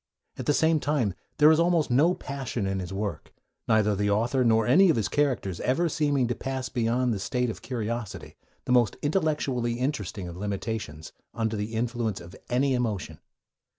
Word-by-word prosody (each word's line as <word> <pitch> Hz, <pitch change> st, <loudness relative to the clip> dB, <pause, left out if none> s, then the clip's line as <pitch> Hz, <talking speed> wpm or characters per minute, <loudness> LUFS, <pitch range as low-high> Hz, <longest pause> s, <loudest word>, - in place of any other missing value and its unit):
At -, -, -7 dB
the 145 Hz, -, +4 dB
same 160 Hz, -1 st, +3 dB
time, 140 Hz, -10 st, 0 dB, 0.2 s
there 150 Hz, +1 st, +7 dB
is 160 Hz, -, +4 dB
almost 170 Hz, -4 st, +2 dB
no 155 Hz, +9 st, +4 dB
passion 130 Hz, -6 st, -4 dB
in 95 Hz, 0 st, -1 dB
his 90 Hz, 0 st, -5 dB
work, 95 Hz, -6 st, -4 dB, 0.4 s
neither 105 Hz, -2 st, +3 dB
the 105 Hz, +1 st, 0 dB
author 120 Hz, +6 st, +2 dB
nor 115 Hz, -2 st, +3 dB
any 175 Hz, +10 st, +6 dB
of 160 Hz, -, +4 dB
his 110 Hz, -3 st, 0 dB
characters 125 Hz, -, 0 dB
ever 140 Hz, +7 st, +1 dB
seeming 145 Hz, -3 st, +1 dB
able 120 Hz, -, 0 dB
to 120 Hz, -, -3 dB
pass 130 Hz, -1 st, -3 dB
beyond 120 Hz, +1 st, +1 dB
the 100 Hz, -, -3 dB
state 125 Hz, +4 st, -1 dB
of -, -, -10 dB
curiosity, 115 Hz, -3 st, -5 dB, 0.3 s
the -, -, -2 dB
most 120 Hz, -3 st, +3 dB
intellectually 145 Hz, -7 st, 0 dB
interesting 115 Hz, -7 st, -3 dB
of 85 Hz, -, -8 dB
limitations, 100 Hz, -6 st, -4 dB, 0.2 s
under 110 Hz, -1 st, -1 dB
the 105 Hz, +2 st, -4 dB
influence 115 Hz, -3 st, -1 dB
of 85 Hz, +2 st, -12 dB
any 130 Hz, +2 st, +2 dB
emotion. 105 Hz, -, -2 dB
120 Hz, 185 wpm, -27 LUFS, 105-140 Hz, 0.4 s, there